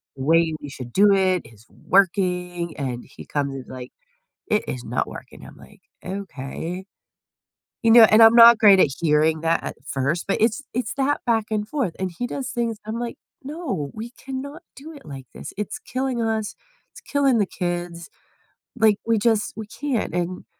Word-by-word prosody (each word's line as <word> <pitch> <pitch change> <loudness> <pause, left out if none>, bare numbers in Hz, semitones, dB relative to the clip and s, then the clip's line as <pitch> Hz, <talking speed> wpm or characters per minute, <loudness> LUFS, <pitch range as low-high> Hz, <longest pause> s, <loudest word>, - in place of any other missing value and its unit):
the 130 - -6
way 165 +1 +3
we 145 - -7
should 125 -3 -9
do 205 +1 +5
it 185 -2 +2
is 110 -1 -17
working, 180 -3 0
and 125 -4 -4
he - - -13
comes, 140 -2 -2
he's 130 -2 -8
like, 125 -1 -9 0.6
"It 210 - +1
is 125 -1 -5
not - - -2
working," - - -11
I'm - - -14
like, - - -17 0.2
"Okay," 180 -1 -6 1.0
you 230 - +3
know, 235 +1 +9
and 215 +1 +6
I'm 225 0 +8
not 235 -1 +9
great 205 -4 +7
at - - +5
hearing 155 0 +2
that 165 0 +1
at - - -5
first, 140 +5 -2
but 195 - +1
it's 225 +3 +2
it's 245 -3 -2
that 280 +2 0
back 225 -3 +1
and 210 -1 -1
forth, 250 - -2
and 190 -1 -2
he 245 - -1
does 260 +1 -5
things, 230 -2 -2
I'm 225 +2 -4
like, 240 -1 -4 0.3
"No, 275 - -4
we 225 +2 -7
cannot 270 +3 -6 0.2
do 305 +4 -10
it 290 - -14
like 135 -3 -9
this, - - -9
it's 210 +4 -4
killing 255 -1 -3
us, 220 -2 -2 0.4
it's - - -13
killing 275 -4 +1
the 205 - +2
kids. 175 -1 -4 0.7
Like, 220 -3 +4
we 230 0 +2
just 215 0 +1
we 220 - -5
can't." 250 - -3
And 180 +1 -3
200 Hz, 185 wpm, -23 LUFS, 165-235 Hz, 1.0 s, know